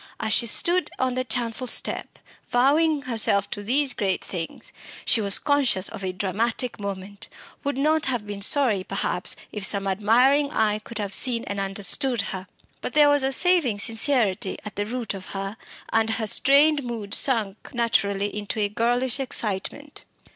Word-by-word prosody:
As 220 -2 0
she 235 - +3
stood 350 +10 +3
on 260 -1 -1
the 255 +1 -2
chancel 240 +1 -1
step, - - -2 0.3
vowing 290 +4 +2
herself 220 -5 0
to 205 - -5
these 265 +6 +1
great 195 -4 -2
things, 170 -3 -7 0.3
she 230 - +2
was 200 -1 +6
conscious 275 -10 +1
of 195 - -9
a 185 - -2
dramatic 220 +5 -2
moment 200 0 -7 0.3
would 285 -2 -2
not 310 +2 +1
have 245 -5 -2
been 205 -1 -7
sorry, 225 -4 +1
perhaps, - - -2 0.2
if 210 - -5
some 195 0 +2
admiring 240 +9 +2
eye 215 -6 0
could 230 +1 -10
have 200 -2 -4
seen 235 -1 +2
and 200 - -5
understood 200 +5 +2
her. 190 0 -7 0.3
But - - -5
there 295 -1 +5
was 290 0 +2
a 265 0 0
saving 320 - +2
sincerity 220 -3 +1
at 210 - -8
the 205 +1 -3
root 240 -2 -4
of 190 -1 -9
her, 195 +1 -5 0.4
and 225 0 +2
her 225 0 -2
strained 285 +6 +5
mood 225 -4 -6
sank 220 -8 0
naturally 205 -5 -1
into 210 +1 -4
a 205 -1 0
girlish 245 +4 0
excitement. 255 +3 -3
225 Hz, 170 wpm, -24 LUFS, 200-265 Hz, 0.4 s, was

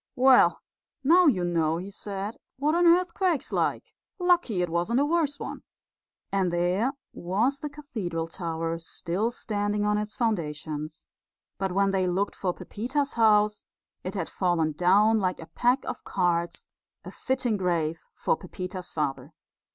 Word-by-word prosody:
"Well, 260 0 +5 0.4
now 345 +5 +6
you 195 -11 +3
know," 165 -2 +1
he 190 +3 -6
said, 200 +1 -5 0.2
"what 295 +3 +1
an 345 +1 +4
earthquake's 350 -2 +2
like. - - -1 0.2
Lucky 350 - +2
it 175 - -2
wasn't 175 +9 +1
a 285 - +3
worse 300 -2 0
one." - - -6 0.7
And 190 -3 +1
there 180 +9 +1 0.2
was 220 +11 0
the 295 - -4
cathedral 215 - -4
tower 165 -1 -3
still 175 +6 -2
standing 205 -3 -2
on 210 0 +2
its 210 0 -5
foundations, 155 - -3 0.5
but 195 -1 -1
when 195 +1 +2
they 190 -1 +1
looked 190 +3 0
for 185 - -1
Pepita's 265 +10 -3
house 210 -2 +3 0.4
it 185 - -5
had 175 -5 -2
fallen 175 -4 0
down 200 +7 +4
like 185 -3 -1
a 165 - -8
pack 250 +3 +2
of - - -5
cards, 170 -2 -1 0.4
a - - -7
fitting 255 -3 -1
grave 170 -4 -1
for - - +1
Pepita's 180 +1 -7
father. 140 -1 -3
195 Hz, 150 wpm, -27 LUFS, 175-245 Hz, 0.7 s, now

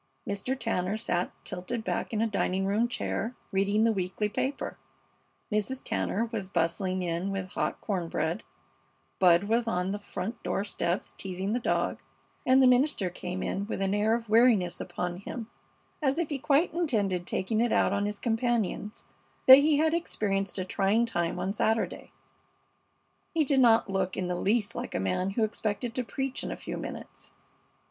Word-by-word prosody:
Mr. 205 +7 -2
Tanner 205 -3 -1
sat 185 -5 -1
tilted 185 +6 -4
back - - -2
in 220 -1 0
a - - +3
dining 195 -3 0
room 210 +4 +2
chair, 240 0 -3 0.2
reading 200 +3 +2
the 230 - +4
weekly 190 +1 -1
paper, 265 +6 -3 0.7
Mrs. 215 +5 -1
Tanner 225 +4 -1
was 210 -5 -3
bustling 185 +1 0
in 170 +2 -1
with 190 -1 -3
hot - - -2
corn 185 -5 -2
bread, 165 +5 -1 0.8
Bud 175 -1 +6
was 230 +3 +1
on 180 -3 0
the 205 - -3
front 205 +3 -5
door 195 - -1
steps 175 -3 -2
teasing 190 +2 -3
the 245 - +1
dog, 240 - 0 0.5
and 265 +1 +6
the - - +7
minister 250 -7 +3
came 180 +1 -4
in 200 +1 -2
with - - -3
an 195 0 +1
air 215 +2 +3
of 230 -1 -5
weariness 215 -6 +4
upon 175 0 -3
him, 225 +4 -7 0.5
as 275 0 +1
if 340 -3 0
he 285 -3 -2
quite 290 +5 +2
intended 205 - 0
taking 215 +4 0
it 240 -1 +2
out - - +3
on 200 0 0
his 210 0 -3
companions 225 -3 -1 0.4
that 260 +1 +11
he 295 +1 +3
had 315 +1 +3
experienced 200 - -1
a 185 - -2
trying 200 +5 +2
time 175 -7 -1
on 195 - -1
Saturday. 220 +1 0 1.2
He 320 - +4
did 275 -1 +2
not 230 -4 +5
look 190 -1 -1
in 185 - -1
the 180 - -1
least 205 +4 +1
like - - -5
a - - +1
man 95 - 0
who 225 - +3
expected 220 +2 -2
to 255 - -1
preach 270 +2 -3
in - - -4
a - - -3
few - - -5
minutes. - - -8
210 Hz, 180 wpm, -29 LUFS, 185-235 Hz, 1.2 s, that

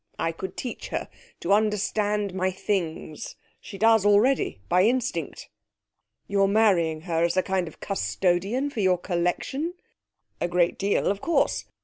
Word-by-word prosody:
I 165 - 0
could 190 +3 -7
teach 245 - -5
her - - -4 0.3
to 190 - +2
understand 210 -1 +1
my 185 0 0
Things. 175 -5 -3 0.2
She 200 - -10
does 225 0 +4
already 205 - +3
by 180 - +3
instinct.' 225 - -1 0.8
'You're 200 -1 +2
marrying 185 -7 +2
her 165 -1 0
as 170 +2 +1
a 185 - +4
kind 190 -2 -1
of 155 - -12
custodian 195 +7 0
for 235 - -5
your 185 -3 +3
collection?' 180 - -2 0.6
'A - - 0
great 175 0 +1
deal, 200 +1 +1
of 200 0 0
course. 340 - +1
195 Hz, 145 wpm, -25 LUFS, 175-210 Hz, 0.8 s, does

